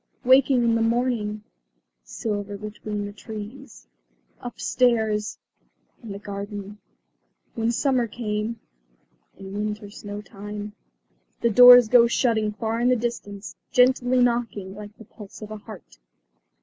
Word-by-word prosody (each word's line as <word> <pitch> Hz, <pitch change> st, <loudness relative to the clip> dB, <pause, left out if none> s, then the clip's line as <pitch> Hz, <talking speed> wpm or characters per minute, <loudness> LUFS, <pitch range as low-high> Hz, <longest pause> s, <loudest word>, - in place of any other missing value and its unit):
"Waking 260 Hz, 0 st, +5 dB
in 230 Hz, -1 st, +3 dB
the 230 Hz, -, +1 dB
morning 225 Hz, -3 st, 0 dB, 0.3 s
" -, -, -46 dB, 0.2 s
"Silver 205 Hz, -, -4 dB
between 210 Hz, 0 st, -5 dB
the 205 Hz, -, -7 dB
trees 215 Hz, +4 st, -10 dB, 0.3 s
" -, -, -37 dB
"Upstairs 230 Hz, -3 st, 0 dB, 0.3 s
" -, -, -41 dB
"In 225 Hz, -4 st, -9 dB
the 200 Hz, -, -5 dB
garden 205 Hz, 0 st, -7 dB, 0.4 s
" -, -, -47 dB
"When 230 Hz, -1 st, 0 dB
summer 255 Hz, -1 st, +1 dB
came 215 Hz, 0 st, -4 dB, 0.4 s
" -, -, -41 dB
"In 195 Hz, 0 st, -9 dB
winter 210 Hz, 0 st, -4 dB
snowtime 205 Hz, 0 st, -8 dB, 0.4 s
" -, -, -43 dB
The 235 Hz, -, +2 dB
doors 245 Hz, +1 st, +9 dB
go 235 Hz, +1 st, +6 dB
shutting 225 Hz, -3 st, +1 dB
far 225 Hz, +1 st, -3 dB
in 245 Hz, +1 st, +2 dB
the 255 Hz, -, +4 dB
distance, 220 Hz, -4 st, -5 dB, 0.2 s
gently 250 Hz, 0 st, +4 dB
knocking 235 Hz, -5 st, -1 dB
like 205 Hz, +1 st, -11 dB
the 225 Hz, -, -13 dB
pulse 210 Hz, -1 st, -13 dB
of 215 Hz, -, -9 dB
a 215 Hz, -, -5 dB
heart. 210 Hz, -, -13 dB
215 Hz, 145 wpm, -24 LUFS, 205-240 Hz, 0.4 s, doors